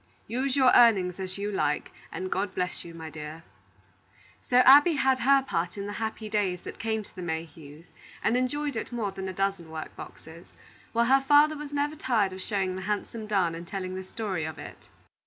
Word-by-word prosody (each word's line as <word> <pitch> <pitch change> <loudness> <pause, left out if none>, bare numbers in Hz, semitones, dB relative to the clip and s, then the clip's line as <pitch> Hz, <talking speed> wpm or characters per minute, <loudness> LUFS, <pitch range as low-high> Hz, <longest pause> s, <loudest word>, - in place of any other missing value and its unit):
Use 255 +3 -1
your 260 -2 +5
earnings 195 -7 +5
as 185 0 -5
you 205 +1 -3
like, 150 -6 -1 0.2
and 185 0 -5
God 190 0 -1
bless 180 0 -2
you, 170 - -10
my 160 -1 -8
dear." 155 +2 -8 1.1
So 245 - +4
Abby 290 +6 +8
had 265 -2 +2
her 275 +2 +4
part 175 -6 -2
in 200 - -4
the 205 - -5
happy 220 0 -3
days 200 -4 -1
that - - -8
came 220 0 -1
to - - -18
the 185 - -7
Mayhews, 160 -1 -7 0.3
and 230 - +2
enjoyed 285 +2 -1
it 225 - -4
more 225 -5 -2
than 190 0 -6
a - - -3
dozen 195 -3 -2
work 160 -1 -7
boxes; 165 +2 -11 0.4
while 235 0 +2
her 270 +2 +5
father 290 +3 +5
was 295 -1 -7
never 290 +1 -1
tired 225 -10 +1
of 185 - -8
showing 190 -2 -1
the 190 - -5
handsome 210 +2 -3
darn 190 -5 +1
and 170 +1 -8
telling 185 -1 -4
the 190 0 -5
story 190 -3 -4
of 155 0 -5
it. - - -11
200 Hz, 205 wpm, -27 LUFS, 180-250 Hz, 1.1 s, Abby